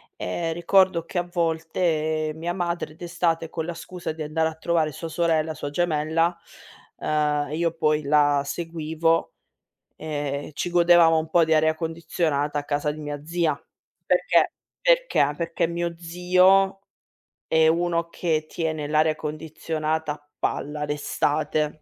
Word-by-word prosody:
Ehm, 165 - -3
ricordo 175 +1 +3
che 175 - -7
a 175 - +2
volte, 160 -2 0
mia 170 +2 -3
madre 170 -3 -3
d'estate 170 -1 -1
con 160 -1 -4
la 175 - -4
scusa 175 0 -6
di 160 - -9
andare 155 +1 0
a 160 - -10
trovare 160 -1 0
sua 165 +4 -6
sorella, 160 -1 +1
sua 145 - -5
gemella, 165 +1 +1 0.6
uhm, 150 -1 0
io 165 +1 0
poi 155 -2 +1
la 145 -1 +3
seguivo, 165 +1 -1 0.6
ehm, 145 -2 -4
ci 175 - -3
godevamo 170 -1 +6
un 160 0 -5
po' 170 +1 +4
di 160 - +2
aria 155 0 +3
condizionata 160 -2 -1
a - - -6
casa 145 0 -1
di 150 - -9
mia 145 -1 -5
zia. 165 -1 +1 0.5
Perché - - +3 0.3
perché? - - +3
Perché 170 0 -1
mio 170 0 -3
zio 185 +3 +3 0.7
è 160 0 +4
uno 170 0 +1
che 160 -3 -1
tiene 155 -3 -3
l'aria 155 +1 +2
condizionata 155 0 -3
a 145 0 -16
palla 150 +1 -2
d'estate. 150 +1 -1
160 Hz, 140 wpm, -24 LUFS, 155-170 Hz, 0.7 s, godevamo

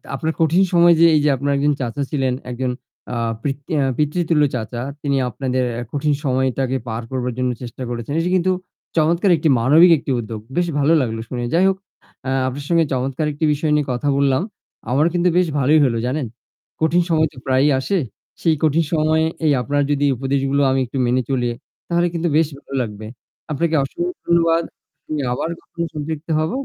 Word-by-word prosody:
আপনার 160 +4 -2
কঠিন 165 +4 +4
সময় 170 0 +6
যে 170 - +7
এই 150 - +3
যে - - +4
আপনার 140 +2 -1
একজন 145 +1 +2
চাচা 125 +3 -3
ছিলেন 135 -3 0 0.2
একজন 125 +1 -2 0.4
আ - - -2 0.8
পিততুল্য 155 +1 +1
চাচা 120 0 -4 0.2
তিনি 140 -2 0
আপনাদের 130 +1 -2 0.3
কঠিন 145 +1 0
সময়টাকে 130 0 0
পার 115 0 -3
করবার 125 -1 -2
জন্য 125 0 +1
চেষ্টা 125 +1 -7
করেছেন। 120 +3 -4
এটা 170 +2 0
কিন্তু 185 +1 +2 0.5
চমৎকার 170 +4 +3
একটি 155 0 +1
মানবিক 155 +9 +6
একটি 140 - -4
উদ্যোগ। 110 -1 -6 0.2
বেশ 175 0 +2
ভালো 145 +3 +3
লাগলো 115 -3 -2
শুনে। 120 -1 -3
যাই 180 +3 +4
হোক 190 - -1 0.7
আপনার 140 +2 -5
সঙ্গে 165 -2 +3
চমৎকার 130 +4 -1
একটি 150 +2 -1
বিষয় 150 +1 -1
নিয়ে 150 -2 +1
কথা 125 +4 -3
বললাম। 140 0 +2 0.5
আমার 145 +5 +3
কিন্তু 180 0 +2
বেশ 180 -1 +3
ভালোই 150 +4 +4
হল 120 -3 +1
জানেন। 130 -1 -2 0.5
কঠিন 160 +3 +3
সময় 160 -1 +3
তো - - -19
প্রায়ই 135 +2 +3
আসে। 195 +9 0 0.4
সেই 165 -2 +3
কঠিন 155 +2 +3
সময়ে 160 0 +2 0.2
এই 150 - +4
আপনার 145 +2 0
যদি 145 0 +1
উপদেশগুলো 135 +2 0
আমি 135 - +1
একটু 125 +3 -6
মেনে 125 +2 +2
চলি 125 -3 0 0.4
তাহলে 175 0 +2
কিন্তু 170 0 -1
বেশ 160 - +3
ভালো 140 - -13
লাগবে। 110 -2 -6 0.5
আপনাকে 165 +2 0
অসংখ্য 350 - -4
ধন্যবাদ। 170 -1 +3 0.4
আমি 150 -1 -2
আবার 140 - -2
কখনো 170 - -6
সন্তপ্ত 155 +1 -5
হব। 155 +2 0
145 Hz, 180 wpm, -20 LUFS, 130-165 Hz, 0.8 s, যে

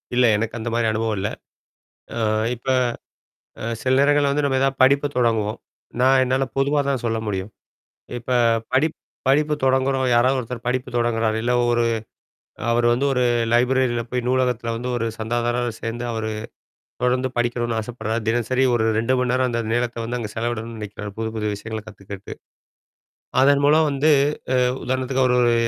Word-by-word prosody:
இல்ல, 125 0 +5
எனக்கு 110 +2 -3
அந்த 115 +1 -3
மாதிரி 115 -1 +1
அனுபவம் 110 0 -1
இல்ல. 100 - -1 0.9
அ - - -2 0.4
இப்போ, 125 +2 -1 0.9
அ - - -6 0.2
சில 130 - +1
நேரங்கள்ல 145 0 +4
வந்து 145 +1 0
நம்ம 135 -1 +1
எதாவது 135 0 0
படிப்பை 140 +2 +4
தொடங்குவோம். 110 -3 +1 0.4
நான் 130 +1 +5
என்னால 130 +1 +1
பொதுவா 140 +2 +2
தான் 135 -4 -1
சொல்ல 115 -1 0
முடியும். 95 0 -3 0.7
இப்போ 125 +2 -2 0.4
படிப் 150 +5 +2 0.3
படிப்பு 150 +2 +3
தொடங்குறோம் 130 0 +2
யாராவது 130 +3 +4
ஒருத்தர் 120 -1 -6
படிப்பு 125 +1 -1
தொடங்குகிறார் 115 -2 +1
இல்ல 120 +2 0 0.2
ஒரு 120 0 +2 0.9
அவர் 120 0 +2
வந்து 125 +4 +1
ஒரு 125 -1 +1 0.3
லைப்ரரியில 125 0 +2
போய் 125 0 -2
நூலகத்தில 125 -2 0
வந்து 120 +2 -4
ஒரு 115 - -1
சந்தாதாரரா 120 +2 -1
சேர்ந்து 115 +1 -4
அவர் 110 -1 -3 0.8
தொடர்ந்து 125 +1 +1
படிக்கணும்னு 120 -1 0
ஆசைப்படுறார். 110 0 -3
தினசரி 120 +3 +1
ஒரு 110 -2 +1
2 115 +4 +1
மணி 125 -1 +1
நேரம் 130 0 +2
அந்த 120 -1 -1
நேரத்தை 120 0 -1
வந்து 120 +2 -3
அங்கே 110 -3 -5
செலவிடணும்னு 115 0 -3
நினைக்கிறார். 105 0 -7
புது, 110 0 -2
புது 105 -1 -2
விஷயங்களை 110 +1 -6
கத்துக்கறதுக்கு, 100 -1 -9 1.1
அதன்மூலம் 145 +3 +4
வந்து, 145 +2 +1 0.5
அ - - +3 0.2
உதாரணத்துக்கு 130 +1 0
அவரு 125 -1 +3
ஒரு 120 -1 +4
120 Hz, 155 wpm, -22 LUFS, 115-130 Hz, 1.1 s, இல்ல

